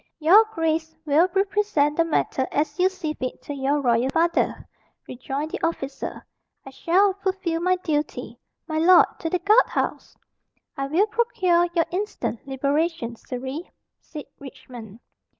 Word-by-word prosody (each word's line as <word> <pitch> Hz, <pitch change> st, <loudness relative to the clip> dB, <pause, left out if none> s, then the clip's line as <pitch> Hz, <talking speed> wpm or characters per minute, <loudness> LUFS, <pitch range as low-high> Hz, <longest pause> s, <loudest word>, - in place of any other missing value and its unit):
"Your 365 Hz, +8 st, +6 dB
grace 325 Hz, -5 st, -2 dB
will 315 Hz, +5 st, +3 dB
represent 390 Hz, -7 st, +1 dB
the 335 Hz, -, +3 dB
matter 285 Hz, -5 st, -1 dB
as 295 Hz, +1 st, -1 dB
you 370 Hz, +1 st, +4 dB
see 350 Hz, -5 st, -4 dB
fit 255 Hz, -4 st, -5 dB
to 290 Hz, -, -6 dB
your 280 Hz, +1 st, 0 dB
royal 240 Hz, 0 st, +2 dB
father," 335 Hz, +4 st, 0 dB, 0.4 s
rejoined 270 Hz, +5 st, -5 dB
the -, -, -5 dB
officer. 280 Hz, -5 st, -4 dB, 0.4 s
"I 270 Hz, -, -9 dB
shall 375 Hz, +8 st, +2 dB
fulfil 375 Hz, -4 st, -2 dB
my 365 Hz, +1 st, +2 dB
duty. 310 Hz, -4 st, -3 dB, 0.3 s
My 315 Hz, -1 st, -1 dB
lord, 355 Hz, +3 st, +7 dB
to 325 Hz, -, -3 dB
the 360 Hz, -, +1 dB
guard 425 Hz, +6 st, +4 dB
house!" -, -, -3 dB, 0.6 s
"I 275 Hz, -2 st, -3 dB
will 335 Hz, +9 st, +2 dB
procure 395 Hz, -6 st, +1 dB
your 330 Hz, -1 st, +3 dB
instant 365 Hz, -, -4 dB
liberation, 280 Hz, -1 st, -1 dB
Surrey," 260 Hz, +8 st, -6 dB, 0.3 s
said 300 Hz, -2 st, -9 dB
Richmond. 240 Hz, -5 st, -11 dB
320 Hz, 145 wpm, -24 LUFS, 275-365 Hz, 0.6 s, lord